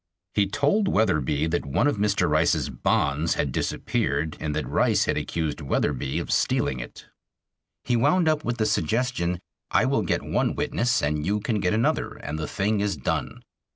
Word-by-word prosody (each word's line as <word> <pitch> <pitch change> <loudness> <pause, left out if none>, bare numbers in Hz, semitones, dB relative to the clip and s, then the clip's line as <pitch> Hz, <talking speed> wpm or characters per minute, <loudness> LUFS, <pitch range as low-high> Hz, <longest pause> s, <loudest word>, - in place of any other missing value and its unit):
He 100 -1 +2
told 145 - +1
Wetherbee 75 - +1
that 85 - 0
one 70 - 0
of 145 -6 +1
Mr. 100 -1 +1
Rice's - - +2
bonds 75 +4 +1
had 70 - -1
disappeared 70 +4 -1
and 75 -1 -3
that 80 - -2
Rice - - +2
had - - 0
accused 80 -2 -2
Wetherbee 70 -1 -1
of - - -3
stealing 65 - +1
it. - - -9 0.8
He 125 - +1
wound 150 +8 +3
up 155 -1 +2
with 120 0 -2
the 110 - +1
suggestion, 110 -7 0 0.3
"I - - +3
will - - +1
get - - -1
one - - 0
witness 120 +1 0
and 75 +1 0
you 100 +6 0
can 110 0 -1
get 95 +1 +1
another, 115 +2 0
and 75 +2 -5
the 75 - -3
thing 105 +1 0
is 100 -4 -1
done." 65 - -3
100 Hz, 180 wpm, -25 LUFS, 75-115 Hz, 0.8 s, wound